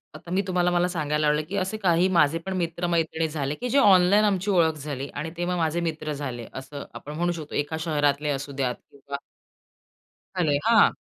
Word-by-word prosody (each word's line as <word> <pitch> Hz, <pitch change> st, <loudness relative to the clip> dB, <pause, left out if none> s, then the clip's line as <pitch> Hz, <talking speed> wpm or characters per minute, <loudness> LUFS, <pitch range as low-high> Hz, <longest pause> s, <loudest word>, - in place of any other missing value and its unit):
आता 170 Hz, -, -10 dB
मी 190 Hz, -, +2 dB
तुम्हाला 180 Hz, -1 st, +2 dB
मला 175 Hz, 0 st, +2 dB
सांगायला 150 Hz, -3 st, 0 dB
आवडेल, 150 Hz, +1 st, +1 dB
की 200 Hz, -, -3 dB
असे 190 Hz, +3 st, -1 dB
काही 180 Hz, -3 st, +3 dB
माझे 155 Hz, +2 st, +4 dB
पण 190 Hz, -, -3 dB
मित्र-मैत्रिणी 165 Hz, -2 st, 0 dB
झाले, 150 Hz, -2 st, -3 dB
की 250 Hz, -, -4 dB
जे 275 Hz, -, +2 dB
ऑनलाईन 200 Hz, -3 st, +6 dB
आमची 200 Hz, -1 st, +1 dB
ओळख 165 Hz, -4 st, +4 dB
झाली. 140 Hz, -2 st, -5 dB
आणि 150 Hz, +3 st, -4 dB
तेव्हा 175 Hz, +1 st, -1 dB
माझे 165 Hz, 0 st, 0 dB
मित्र 155 Hz, -2 st, -3 dB
झाले 130 Hz, -5 st, -5 dB
असं 140 Hz, +2 st, -7 dB
आपण 150 Hz, -, -8 dB
म्हणू 175 Hz, +2 st, 0 dB
शकतो. 155 Hz, -3 st, -7 dB
एका 145 Hz, +2 st, -1 dB
शहरातले 150 Hz, -2 st, +1 dB
असुद्यात 135 Hz, -2 st, -2 dB, 0.2 s
किंवा 140 Hz, 0 st, -7 dB, 1.2 s
झाले 155 Hz, -5 st, +2 dB
हां. 225 Hz, -2 st, +6 dB
160 Hz, 185 wpm, -25 LUFS, 145-180 Hz, 1.2 s, ऑनलाईन